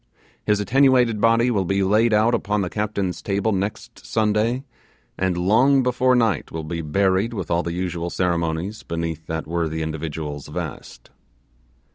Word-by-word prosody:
His 105 -1 +3
attenuated 125 -1 +3
body 115 +2 +4
will 100 -5 +1
be 95 +2 0
laid 110 +4 +3
out 110 +3 +3
upon 105 -3 0
the 90 - -3
captain's 100 -3 -2
table 100 +2 0
next 100 +1 -4
Sunday, 110 +4 0 0.5
and 95 -2 -1
long 125 +9 +4
before 125 +1 +2
night 115 -9 +1
will 80 -1 -4
be 85 +2 -4
buried 95 +7 +1
with 100 - -4
all 85 0 +2
the 85 -1 -4
usual 85 -1 -3
ceremonies 85 +3 -1
beneath 85 -1 -4
that 80 0 -3
worthy 80 -1 -2
individual's 80 -2 -5
vest. - - -7
100 Hz, 150 wpm, -22 LUFS, 85-110 Hz, 0.5 s, body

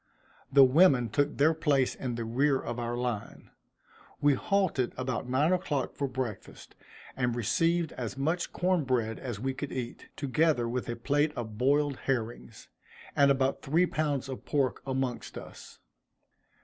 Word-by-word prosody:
The 140 0 +8
women 130 -3 +5
took 145 +7 0
their 155 +3 +4
place 150 -5 +1
in 125 -3 -4
the 115 -1 -3
rear 135 +4 +2
of 120 +1 -5
our 120 0 -2
line. 120 -4 -4 0.7
We 145 0 +4
halted 165 -4 0
about 125 -1 -3
nine 145 +7 +3
o'clock 150 -8 -1
for 140 0 -2
breakfast, 125 -6 -6 0.4
and 125 -2 0
received 165 +8 +1
as 125 +1 -5
much 160 +6 -1
corn 180 -2 +1
bread 120 -4 -1
as 120 -6 -5
we 135 +3 -2
could 140 +1 -5
eat, 125 -2 -5
together 145 -2 +1
with 125 +1 -3
a 120 - -2
plate 145 +5 +1
of 110 -3 -6
boiled 140 +1 +2
herrings, 120 -3 -3 0.5
and 140 -1 +5
about 135 0 +1
three 165 +6 +2
pounds 150 -5 -1
of 130 -1 -7
pork 140 -4 0
amongst 130 -2 -3
us. - - -11
135 Hz, 155 wpm, -29 LUFS, 120-145 Hz, 0.7 s, The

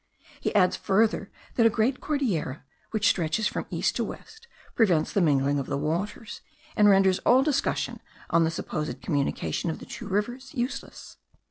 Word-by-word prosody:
He - - -2
adds 185 -3 +4
further, 205 0 +1 0.2
that 230 - +3
a - - +4
great 225 +4 0
Cordillera, 205 - -1 0.3
which 215 -2 +1
stretches 170 +5 +1
from - - -4
east - - 0
to - - 0
west, 450 +1 -9 0.3
prevents 180 -9 +2
the 200 - +2
mingling 145 -3 +2
of 135 - -4
the 140 - -1
waters, 175 +9 -3 0.3
and 210 -1 +6
renders 195 -1 +4
all 255 +3 +4
discussion 280 -2 -1 0.3
on 165 0 +4
the 160 - +2
supposed 155 -2 -4
communication 145 +2 -1
of 160 - -3
the - - -11
two - - -8
rivers 240 +8 -3
useless. 245 +1 -5
195 Hz, 165 wpm, -26 LUFS, 160-230 Hz, 0.3 s, and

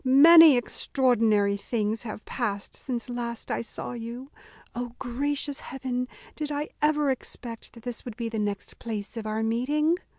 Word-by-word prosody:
many 300 +2 +9
extraordinary 225 -5 +2
things 215 +1 -1
have 215 -2 -7
passed 205 -5 -3
since 245 -2 -4
last 240 -2 -4
I - - 0
saw 230 - -5
you. 240 +3 -7 0.4
O 245 0 -5
gracious 285 +3 -2
heaven! 250 -2 -3 0.3
did 300 -1 -3
I 295 +1 -2
ever 300 -2 +3
expect 235 -2 -6
that 230 - -14
this 245 -2 -4
would 240 -3 -7
be 235 -2 -2
the 225 -1 -3
next 205 -1 -3
place 215 -2 -5
of 225 -2 -4
our 215 +1 -1
meeting?" 290 +9 +1
245 Hz, 160 wpm, -27 LUFS, 225-275 Hz, 0.4 s, many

